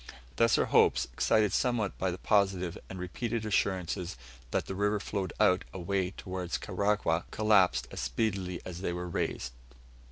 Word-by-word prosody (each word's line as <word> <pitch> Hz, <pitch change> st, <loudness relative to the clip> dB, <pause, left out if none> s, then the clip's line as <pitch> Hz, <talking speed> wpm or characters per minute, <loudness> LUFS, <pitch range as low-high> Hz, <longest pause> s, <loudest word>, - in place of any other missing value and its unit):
Thus 115 Hz, 0 st, +4 dB
our -, -, +3 dB
hopes, -, -, +4 dB
excited 105 Hz, -3 st, +2 dB
somewhat 120 Hz, -6 st, +1 dB
by 95 Hz, -, +1 dB
the 90 Hz, -, -3 dB
positive 95 Hz, -4 st, +1 dB
and 95 Hz, -, -7 dB
repeated 110 Hz, +5 st, -3 dB
assurances 95 Hz, -3 st, -1 dB, 0.3 s
that -, -, 0 dB
the -, -, -5 dB
river 105 Hz, +2 st, +1 dB
flowed 100 Hz, -1 st, -3 dB
out 90 Hz, 0 st, +4 dB
away 95 Hz, 0 st, -1 dB
towards 90 Hz, -1 st, -4 dB
Karagwah, 100 Hz, -4 st, 0 dB
collapsed 95 Hz, -, +3 dB
as -, -, -6 dB
speedily 95 Hz, -5 st, -1 dB
as 90 Hz, -1 st, -6 dB
they 90 Hz, -, -1 dB
were 90 Hz, 0 st, -4 dB
raised. 65 Hz, -7 st, -2 dB
95 Hz, 155 wpm, -30 LUFS, 90-105 Hz, 0.3 s, Thus